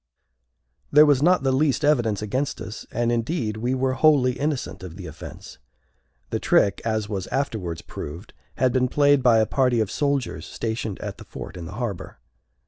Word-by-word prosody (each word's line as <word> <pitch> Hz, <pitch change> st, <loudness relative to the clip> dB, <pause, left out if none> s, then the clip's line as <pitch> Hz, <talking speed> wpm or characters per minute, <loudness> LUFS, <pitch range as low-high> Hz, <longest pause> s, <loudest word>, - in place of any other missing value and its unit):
There 150 Hz, +1 st, +8 dB
was 145 Hz, -3 st, +4 dB
not 180 Hz, 0 st, +4 dB
the 135 Hz, -, +2 dB
least 140 Hz, +1 st, +2 dB
evidence 115 Hz, -8 st, +2 dB
against 130 Hz, +5 st, -2 dB
us; 110 Hz, 0 st, -8 dB
and, 120 Hz, +1 st, 0 dB
indeed, 115 Hz, -2 st, -1 dB
we 120 Hz, +4 st, -1 dB
were 130 Hz, 0 st, 0 dB
wholly 135 Hz, -3 st, +4 dB
innocent 140 Hz, +2 st, -3 dB
of 90 Hz, -3 st, -8 dB
the 95 Hz, -2 st, -8 dB
offence. 75 Hz, -1 st, -10 dB, 0.7 s
The -, -, 0 dB
trick, 100 Hz, -, +2 dB
as 110 Hz, -2 st, -1 dB
was 100 Hz, -3 st, -4 dB
afterwards 105 Hz, -12 st, -3 dB
proved, 85 Hz, +8 st, -8 dB, 0.2 s
had 130 Hz, -1 st, +2 dB
been 130 Hz, -1 st, +2 dB
played 145 Hz, +1 st, +4 dB
by 120 Hz, -3 st, +5 dB
a 110 Hz, -, +4 dB
party 125 Hz, -1 st, +2 dB
of 110 Hz, -2 st, 0 dB
soldiers 140 Hz, -3 st, -1 dB
stationed 110 Hz, -3 st, -3 dB
at -, -, -6 dB
the -, -, -9 dB
fort -, -, -9 dB
in 85 Hz, -2 st, -7 dB
the 85 Hz, -, -8 dB
harbor. 110 Hz, -5 st, -5 dB
120 Hz, 180 wpm, -24 LUFS, 105-140 Hz, 0.7 s, There